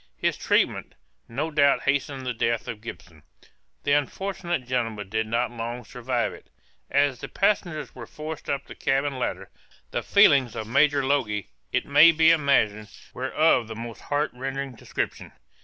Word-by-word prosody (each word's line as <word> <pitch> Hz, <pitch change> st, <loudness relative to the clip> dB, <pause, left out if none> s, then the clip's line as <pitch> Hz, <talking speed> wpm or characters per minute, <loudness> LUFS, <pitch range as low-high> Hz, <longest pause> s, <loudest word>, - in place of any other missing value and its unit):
This -, -, +1 dB
treatment, -, -, 0 dB, 0.3 s
no 150 Hz, +7 st, -3 dB
doubt 140 Hz, -2 st, +3 dB
hastened 140 Hz, -1 st, -1 dB
the 125 Hz, -, -1 dB
death 115 Hz, 0 st, -1 dB
of 110 Hz, -2 st, -6 dB
Gibson; 85 Hz, -7 st, -10 dB, 0.6 s
the 145 Hz, -, 0 dB
unfortunate 175 Hz, +1 st, -1 dB
gentleman 115 Hz, -5 st, -2 dB
did 110 Hz, +1 st, -1 dB
not 120 Hz, +2 st, 0 dB
long 120 Hz, 0 st, -5 dB
survive -, -, -2 dB
it. -, -, -15 dB, 0.4 s
As 140 Hz, -3 st, +2 dB
the -, -, -6 dB
passengers 175 Hz, -8 st, 0 dB
were 120 Hz, -3 st, -9 dB
forced 155 Hz, 0 st, -7 dB
up 140 Hz, 0 st, -2 dB
the -, -, -10 dB
cabin 135 Hz, 0 st, 0 dB
ladder, 125 Hz, -, -3 dB, 0.4 s
the -, -, -1 dB
feelings 140 Hz, -, +4 dB
of 110 Hz, -, -4 dB
Major 140 Hz, +4 st, +3 dB
Logie, 105 Hz, -, 0 dB, 0.2 s
it -, -, 0 dB
may 150 Hz, +4 st, +7 dB
be 160 Hz, 0 st, +5 dB
imagined, 110 Hz, -9 st, +2 dB, 0.2 s
were 130 Hz, +1 st, -3 dB
of 155 Hz, -7 st, +3 dB
the 110 Hz, -, -7 dB
most 115 Hz, 0 st, -7 dB
heart 145 Hz, +1 st, -1 dB
rending 135 Hz, +1 st, -4 dB
description. -, -, -5 dB
135 Hz, 160 wpm, -25 LUFS, 115-145 Hz, 0.6 s, may